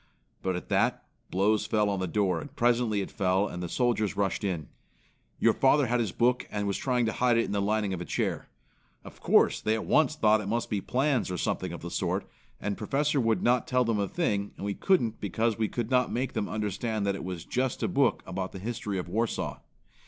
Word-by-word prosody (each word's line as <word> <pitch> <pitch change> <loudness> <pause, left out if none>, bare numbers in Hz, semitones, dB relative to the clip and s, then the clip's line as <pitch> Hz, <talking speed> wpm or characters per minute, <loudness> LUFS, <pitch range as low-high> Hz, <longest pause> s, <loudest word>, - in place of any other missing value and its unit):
"But 95 -1 -1
at 90 - -6
that, - - +1 0.2
blows 105 +3 +2
fell 105 -1 +2
on 100 -2 -1
the 95 - -1
door 95 +1 +1
and 145 - -11
presently 120 -3 +2
it - - -5
fell 95 0 +1
and 90 - -6
the 90 - -4
soldiers 120 -3 0
rushed 100 0 0
in. 85 -7 -2 0.7
Your - - +4
father 135 +1 +4
had 125 0 +1
his 110 -5 0
book 125 +4 +1
and 105 -1 -2
was 100 -1 0
trying 125 -2 +1
to 110 - -1
hide 120 -2 +2
it 115 - +2
in - - -5
the 100 0 0
lining 105 -1 0
of 90 - -4
a - - -4
chair. - - -2 0.5
Of - - -12
course - - +4
they 110 - +1
at 110 - -4
once 155 0 +3
thought 110 -6 +4
it 100 - -6
must 115 +3 -1
be 100 -2 0
plans 130 -1 +1
or 90 - -3
something - - -2
of - - -8
the - - -5
sort, - - -1 0.3
and 105 -1 -3
Professor 140 +5 +1
would 115 -2 +1
not 120 0 +2
tell 125 -1 +2
them 115 -2 0
a 100 - 0
thing 105 - -1
and - - -5
we 100 - -1
couldn't 120 - +1
because 110 +3 0
we 110 - +2
could 120 +1 -4
not 125 -1 +3
make 130 +2 -2
them 110 -3 -2
understand 105 +1 -2
that 100 - +1
it 95 - -6
was 90 -2 -5
just 130 0 -1
a - - +2
book 135 -3 +2
about 95 0 -4
the - - -6
history 105 -1 -4
of 90 - -4
Warsaw. 110 +5 -2
110 Hz, 235 wpm, -28 LUFS, 100-120 Hz, 0.7 s, Your